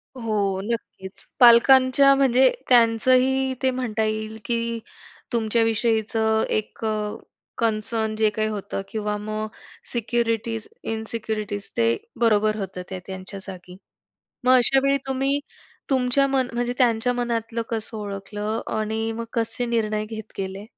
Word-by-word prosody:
हो. 205 -5 -1
नक्कीच. 200 -3 -5
पालकांच्या 260 +3 +7
म्हणजे 260 -1 +4 0.2
त्यांचंही 255 +3 +4
ते 260 - +3
म्हणता 235 -4 -2
येईल, 215 0 -3
की 230 -1 -1 0.5
तुमच्याविषयीचं 220 -1 +1
एक 215 +1 -3
अ, 210 -1 -1 0.4
कन्सर्न 220 0 -1
जे 215 0 +3
काही 215 +1 -1
होतं 200 -2 -4
किंवा 210 -1 -2
मग 215 +1 -4 0.4
सिक्युरिटीज, 230 -1 -1 0.2
इनसिक्युरिटीज 220 -2 -4
ते 115 0 +3 0.3
बरोबर 215 -2 +3
होतं 190 -3 -5
ते 190 -1 -5
त्यांच्या 190 +1 -7
जागी. 180 -1 -10 0.7
मग 255 - +5
अशावेळी 270 +3 +4
तुम्ही 270 +1 +1 0.5
तुमच्या 260 +1 +3
मन 270 -2 +1
म्हणजे 245 0 -1
त्यांच्या 245 -1 +3
मनातलं 235 -1 -2
कसं 225 0 -4
ओळखलं? 205 +1 -4 0.2
आणि 220 +1 -2
मग 230 +1 -4
कसे 230 +1 0
निर्णय 215 -2 0
घेत 220 -1 -8
गेले? 195 +1 -4
225 Hz, 120 wpm, -23 LUFS, 215-240 Hz, 0.7 s, पालकांच्या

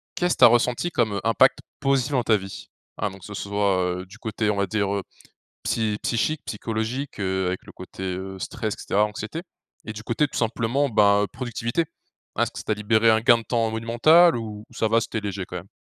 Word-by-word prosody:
Qu'est 180 - +1
ce - - +1
tu - - +3
as - - +12
ressenti 120 +7 +2
comme 110 -8 0
impact 115 +4 +4 0.2
positif 135 0 +1
dans 125 -3 +2
ta 110 -2 +4
vie? 95 0 -9 0.3
Hein, 105 -1 -1
donc 95 -1 -13
que - - -10
ce 105 - -8
soit 95 -3 0
du 100 +4 -15
côté, 110 -1 -2
on 105 - +1
va 100 - +1
dire, 100 0 0 0.8
psy 110 -2 0
psychique, 140 +6 0
psychologique, 115 +4 -4
heu, 95 -1 0
avec 90 0 -2
le - - -11
côté, 95 +1 -9
heu, 95 +1 -4
stress 110 +3 -3
et - - -29
cetera, 105 +2 +2
anxiété. 105 +9 -5 0.4
Et 110 - -5
du 110 - -8
côté, 120 +6 +1
tout - - -6
simplement, 120 +4 0
ben 105 -2 +4
productivité. 120 +5 -2 0.5
Hein, - - +2
est-ce - - -2
que - - -11
ça - - -7
t'a 110 - +1
libéré 110 +2 +3
un 110 0 +4
gain 120 0 +6
de 115 - -9
temps 115 -2 0
monumental 120 +10 +5
ou 110 -2 -6
ça 110 - 0
va, 115 +1 +3
c'était 110 -1 -3
léger 100 -2 -4
quand - - -6
même? - - -9
110 Hz, 220 wpm, -24 LUFS, 100-120 Hz, 0.8 s, as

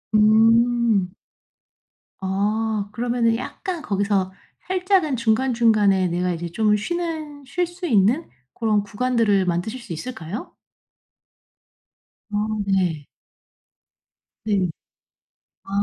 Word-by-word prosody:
음. 225 -1 +4 1.1
아. 205 +2 -1
그러면은 235 0 +1
약간 340 - -5
거기서 200 -4 0 0.4
살짝은 370 -5 +1
중간중간에 225 -5 +3
내가 180 +1 -1
이제 170 0 -4
좀 210 +3 +2
쉬는 310 +2 -4
쉴 350 +6 -1
수 350 +1 -8
있는 230 - +2 0.2
고런 215 -3 +1
구간들을 210 -2 +1
만드실 180 +8 -2
수 210 -8 -7
있을까요? 195 +1 -6 1.8
아 205 - +1 0.3
네. 175 -7 0 1.4
네. 195 -4 +1 1.0
아. - - -19
220 Hz, 180 characters per minute, -22 LUFS, 195-255 Hz, 1.8 s, 음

